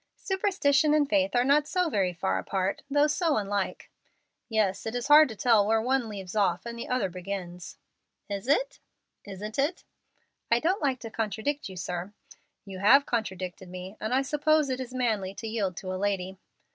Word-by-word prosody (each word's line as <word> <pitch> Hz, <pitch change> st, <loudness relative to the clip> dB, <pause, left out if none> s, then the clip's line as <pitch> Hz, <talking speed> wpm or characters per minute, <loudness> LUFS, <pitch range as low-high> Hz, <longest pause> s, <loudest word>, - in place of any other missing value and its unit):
"Superstition 315 Hz, -7 st, +2 dB
and 295 Hz, -2 st, +3 dB
faith 290 Hz, -2 st, +1 dB
are 245 Hz, -, +4 dB
not 290 Hz, +3 st, +3 dB
so 365 Hz, -1 st, +1 dB
very 195 Hz, -, +1 dB
far 95 Hz, -, -1 dB
apart, 190 Hz, -, -2 dB
though 290 Hz, +1 st, +4 dB
so 310 Hz, -1 st, +1 dB
unlike." 200 Hz, -2 st, -3 dB, 0.6 s
"Yes, 215 Hz, -3 st, 0 dB
it 225 Hz, -, -4 dB
is 245 Hz, +3 st, -3 dB
hard 300 Hz, -1 st, +8 dB
to 220 Hz, -, -7 dB
tell 220 Hz, 0 st, +4 dB
where 225 Hz, +1 st, +3 dB
one 250 Hz, 0 st, 0 dB
leaves 195 Hz, -2 st, -7 dB
off 190 Hz, -3 st, +1 dB
and 235 Hz, 0 st, -5 dB
the 235 Hz, -, -6 dB
other 250 Hz, -6 st, +1 dB
begins." 180 Hz, -1 st, -7 dB, 0.5 s
"Is 200 Hz, +2 st, -5 dB
it?" -, -, +1 dB, 0.5 s
"Isn't 205 Hz, +4 st, -6 dB
it?" 295 Hz, +6 st, 0 dB, 0.7 s
"I 235 Hz, -, +4 dB
don't 360 Hz, +8 st, 0 dB
like 270 Hz, -4 st, 0 dB
to 225 Hz, -, -7 dB
contradict 220 Hz, +5 st, -2 dB
you, 190 Hz, -, -9 dB
sir." 180 Hz, +3 st, -4 dB, 0.5 s
"You 190 Hz, -2 st, -8 dB
have 270 Hz, +8 st, +6 dB
contradicted 190 Hz, -5 st, -4 dB
me, 185 Hz, +2 st, -8 dB
and 215 Hz, -, -3 dB
I 265 Hz, +2 st, +2 dB
suppose 300 Hz, 0 st, +2 dB
it 255 Hz, -, -2 dB
is 255 Hz, -1 st, -6 dB
manly 220 Hz, -7 st, -1 dB
to 225 Hz, -, -7 dB
yield 200 Hz, -5 st, -2 dB
to 185 Hz, -1 st, -5 dB
a -, -, -3 dB
lady.'" 190 Hz, -2 st, -2 dB
220 Hz, 185 wpm, -28 LUFS, 190-280 Hz, 0.7 s, hard